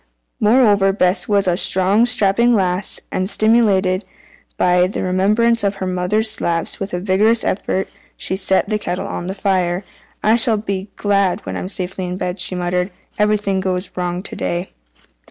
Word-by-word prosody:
Moreover 210 Hz, -3 st, +4 dB
Bess 180 Hz, -1 st, +1 dB
was 200 Hz, -2 st, +1 dB
a 175 Hz, -, +2 dB
strong, 190 Hz, +5 st, +3 dB
strapping 235 Hz, +1 st, +3 dB
lass, 185 Hz, -1 st, 0 dB
and, 185 Hz, 0 st, -1 dB
stimulated 205 Hz, -4 st, +2 dB, 0.5 s
by 180 Hz, 0 st, +3 dB
the 195 Hz, -, -4 dB
remembrance 210 Hz, +5 st, +2 dB
of 200 Hz, 0 st, 0 dB
her 195 Hz, -, -5 dB
mother's 185 Hz, +4 st, 0 dB
slaps, 170 Hz, -6 st, -1 dB
with 195 Hz, 0 st, -4 dB
a -, -, -2 dB
vigorous 210 Hz, +5 st, +2 dB
effort 190 Hz, 0 st, -1 dB, 0.3 s
she 190 Hz, -, -1 dB
set 190 Hz, 0 st, +1 dB
the 210 Hz, 0 st, -1 dB
kettle 180 Hz, -3 st, -4 dB
on 175 Hz, -, -5 dB
the 190 Hz, -, -4 dB
fire. 185 Hz, -2 st, 0 dB, 0.4 s
"I 220 Hz, +2 st, +4 dB
shall 225 Hz, -1 st, +2 dB
be 200 Hz, -1 st, -4 dB
glad 200 Hz, -1 st, 0 dB
when -, -, -5 dB
I'm -, -, -4 dB
safely 185 Hz, -1 st, -4 dB
in 180 Hz, +1 st, -4 dB
bed," 180 Hz, +1 st, -4 dB
she 185 Hz, -, 0 dB
muttered. 180 Hz, +1 st, -1 dB, 0.3 s
"Everything 210 Hz, -2 st, +1 dB
goes 185 Hz, 0 st, -3 dB
wrong 180 Hz, 0 st, -3 dB
to -, -, -6 dB
day." 175 Hz, +2 st, -3 dB
195 Hz, 170 wpm, -18 LUFS, 180-210 Hz, 0.5 s, Moreover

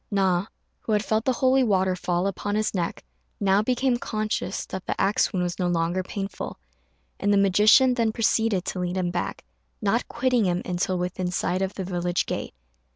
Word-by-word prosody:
Na, 190 Hz, -2 st, +1 dB, 0.3 s
who 220 Hz, -, -2 dB
had 210 Hz, 0 st, +1 dB
felt 220 Hz, +1 st, 0 dB
the 260 Hz, -, +2 dB
holy 260 Hz, +1 st, +3 dB
water 190 Hz, -4 st, +2 dB
fall 180 Hz, 0 st, -1 dB
upon 205 Hz, +1 st, -2 dB
his 215 Hz, 0 st, 0 dB
neck, 175 Hz, -4 st, -2 dB, 0.4 s
now 195 Hz, 0 st, +3 dB
became 250 Hz, +2 st, +1 dB
conscious 215 Hz, -4 st, -3 dB
that 190 Hz, -1 st, -7 dB
the -, -, -2 dB
axe 200 Hz, +3 st, +2 dB
wound 185 Hz, -4 st, -1 dB
was 175 Hz, 0 st, -3 dB
no 180 Hz, -, +1 dB
longer 175 Hz, +1 st, 0 dB
painful; 195 Hz, +1 st, -5 dB, 0.6 s
and 205 Hz, -, +1 dB
the 200 Hz, -, +4 dB
magician 210 Hz, +6 st, +5 dB
then 230 Hz, -3 st, +1 dB
proceeded 220 Hz, -3 st, +1 dB
to 185 Hz, -, -3 dB
lead 180 Hz, +1 st, -2 dB
him 180 Hz, -2 st, 0 dB
back, 175 Hz, -, -4 dB, 0.3 s
not -, -, 0 dB
quitting 250 Hz, -4 st, +1 dB
him 180 Hz, 0 st, 0 dB
until 180 Hz, +1 st, -1 dB
within 180 Hz, 0 st, -2 dB
sight 180 Hz, +1 st, -1 dB
of 190 Hz, +1 st, -2 dB
the 190 Hz, -, -3 dB
village 175 Hz, -1 st, -1 dB
gate. -, -, -4 dB
195 Hz, 190 wpm, -25 LUFS, 180-215 Hz, 0.6 s, magician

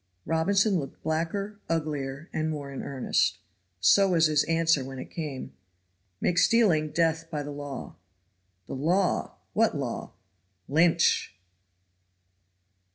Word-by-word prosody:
Robinson 195 Hz, +5 st, +2 dB
looked 135 Hz, -3 st, -8 dB
blacker, 170 Hz, +6 st, -2 dB
uglier 150 Hz, -2 st, -2 dB
and 155 Hz, 0 st, -1 dB
more 145 Hz, -3 st, -5 dB
in 135 Hz, -, -5 dB
earnest. 135 Hz, -2 st, 0 dB, 0.4 s
So 195 Hz, -, +5 dB
was 165 Hz, -1 st, +5 dB
his 155 Hz, -2 st, +3 dB
answer 165 Hz, -3 st, +2 dB
when 135 Hz, 0 st, -8 dB
it -, -, -8 dB
came. 150 Hz, -6 st, -5 dB, 0.7 s
"Make 180 Hz, -, +1 dB
stealing 180 Hz, -10 st, +4 dB
death 165 Hz, 0 st, 0 dB
by 150 Hz, -3 st, -3 dB
the 145 Hz, -, -6 dB
law." 145 Hz, -2 st, -7 dB, 0.7 s
"The -, -, -7 dB
law! 175 Hz, +7 st, 0 dB, 0.2 s
What -, -, +2 dB
law?" -, -, -4 dB, 0.5 s
"Lynch!" 165 Hz, -, +3 dB
160 Hz, 120 wpm, -27 LUFS, 145-170 Hz, 0.7 s, So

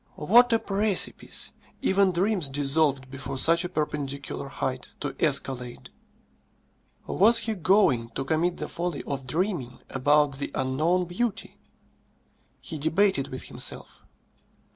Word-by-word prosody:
What 240 Hz, +10 st, +4 dB
a 230 Hz, -, +4 dB
precipice! 205 Hz, -1 st, 0 dB, 0.3 s
Even 190 Hz, 0 st, +3 dB
dreams 180 Hz, -3 st, 0 dB
dissolved 140 Hz, -1 st, +1 dB
before 135 Hz, 0 st, -6 dB
such 165 Hz, +5 st, +6 dB
a 180 Hz, -, -4 dB
perpendicular 140 Hz, -4 st, -4 dB
height 130 Hz, -1 st, -5 dB
to 145 Hz, -2 st, -5 dB
escalade. 135 Hz, -5 st, 0 dB, 1.1 s
Was 225 Hz, +5 st, +4 dB
he 220 Hz, 0 st, -1 dB
going 180 Hz, -, +2 dB
to 135 Hz, -, -3 dB
commit 165 Hz, +4 st, 0 dB
the -, -, -4 dB
folly 175 Hz, -3 st, -4 dB
of 135 Hz, -2 st, -5 dB
dreaming 155 Hz, -, -2 dB
about 145 Hz, +1 st, +2 dB
the -, -, -3 dB
unknown 155 Hz, +8 st, 0 dB
beauty? 195 Hz, +5 st, -4 dB, 1.0 s
He 160 Hz, -4 st, -5 dB
debated 160 Hz, 0 st, +1 dB
with 130 Hz, -, -7 dB
himself. -, -, -5 dB
155 Hz, 120 wpm, -26 LUFS, 135-185 Hz, 1.1 s, such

